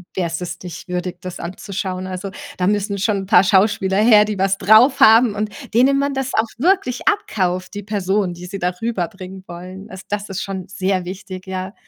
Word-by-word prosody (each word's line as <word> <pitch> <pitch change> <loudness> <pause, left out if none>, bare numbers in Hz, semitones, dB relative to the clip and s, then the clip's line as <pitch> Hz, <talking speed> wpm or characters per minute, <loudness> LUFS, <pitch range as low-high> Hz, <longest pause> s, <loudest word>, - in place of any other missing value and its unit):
wär's 170 -1 -2
es 180 - -5
nicht 175 -1 -8
würdig, 180 0 -3
das 185 -1 -7
anzuschauen. 185 +1 -5
Also, 190 +1 -5 0.3
da 180 - 0
müssen 200 0 0
schon 200 +1 +1
'n 195 - -4
paar 190 -3 +6
Schauspieler 195 -1 +2
her, 215 -1 +6
die 210 -1 -3
was 195 0 +2
drauf 220 +7 +5
haben 225 -1 +6
und 210 +1 -2 0.2
denen 270 +4 +4
man 280 0 0
das 265 -1 -2
auch 225 +1 +2
wirklich 320 -4 +1
abkauft, 185 - 0
die 205 - -5
Person, 195 -2 -1
die 175 +1 -10
sie 195 +1 -6
da 180 +1 0
rüberbringen 190 -3 -4
wollen. 185 +4 -9
Also, 190 0 -9
das 205 0 -3
ist 190 0 -4
schon 195 -1 -5
sehr 190 -2 -1
wichtig, 185 0 -8
ja. 190 +1 -5
195 Hz, 195 wpm, -20 LUFS, 185-215 Hz, 0.3 s, paar